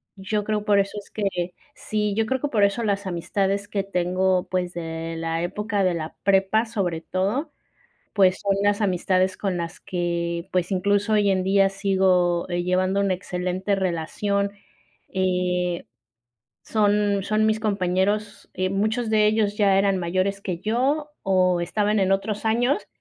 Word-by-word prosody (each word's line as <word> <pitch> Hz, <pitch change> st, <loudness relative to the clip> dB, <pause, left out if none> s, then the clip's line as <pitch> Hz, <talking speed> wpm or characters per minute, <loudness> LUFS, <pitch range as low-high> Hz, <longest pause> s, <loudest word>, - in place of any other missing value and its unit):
Yo 205 Hz, +2 st, -2 dB
creo 210 Hz, 0 st, -1 dB
por 205 Hz, -2 st, +4 dB
eso 200 Hz, +1 st, -1 dB
es 205 Hz, -, -14 dB
que 180 Hz, -4 st, -2 dB, 0.2 s
Sí 210 Hz, -1 st, -2 dB
yo 225 Hz, +1 st, +1 dB
creo 260 Hz, +1 st, 0 dB
que 290 Hz, -, 0 dB
por 210 Hz, -5 st, +2 dB
eso 200 Hz, +4 st, +2 dB
las 200 Hz, -2 st, -1 dB
amistades 195 Hz, +3 st, -1 dB
que 205 Hz, -1 st, -1 dB
tengo, 185 Hz, 0 st, 0 dB
pues, 180 Hz, -1 st, -1 dB
de 165 Hz, -1 st, -5 dB
la 165 Hz, 0 st, -2 dB
época 205 Hz, +3 st, -1 dB
de 180 Hz, -2 st, +2 dB
la 160 Hz, -1 st, -5 dB
prepa, 195 Hz, +3 st, +3 dB
sobre 190 Hz, -8 st, -2 dB
todo, 200 Hz, -, -2 dB, 0.6 s
pues, 190 Hz, -2 st, +4 dB
son 200 Hz, -1 st, +1 dB
las 205 Hz, +1 st, +2 dB
amistades 185 Hz, -1 st, +1 dB
con 195 Hz, -3 st, -2 dB
las 170 Hz, +1 st, -5 dB
que, 170 Hz, 0 st, -3 dB
pues, 180 Hz, +1 st, 0 dB
incluso 205 Hz, +3 st, +1 dB
hoy 205 Hz, -2 st, +3 dB
en 185 Hz, -1 st, +1 dB
día 195 Hz, 0 st, +4 dB
sigo, 190 Hz, -3 st, +2 dB
eh, 175 Hz, 0 st, -1 dB
llevando 185 Hz, +2 st, +1 dB
una 200 Hz, -2 st, +2 dB
excelente 185 Hz, +2 st, -2 dB
relación, 195 Hz, +3 st, -1 dB, 0.6 s
eh, 180 Hz, -2 st, 0 dB, 0.8 s
son 205 Hz, -1 st, +2 dB
son 215 Hz, +2 st, +1 dB
mis 220 Hz, 0 st, +2 dB
compañeros, 200 Hz, 0 st, -1 dB
eh, 185 Hz, 0 st, 0 dB
muchos 220 Hz, +4 st, 0 dB
de 215 Hz, -1 st, +4 dB
ellos 210 Hz, -1 st, +1 dB
ya 200 Hz, -2 st, +4 dB
eran 195 Hz, -1 st, +2 dB
mayores 185 Hz, +3 st, -1 dB
que 180 Hz, -4 st, -3 dB
yo 265 Hz, -, 0 dB
o 185 Hz, -2 st, +2 dB
estaban 205 Hz, +4 st, 0 dB
en 190 Hz, -1 st, +2 dB
otros 205 Hz, +3 st, -1 dB
años 245 Hz, -, +1 dB
195 Hz, 160 wpm, -24 LUFS, 180-210 Hz, 0.8 s, por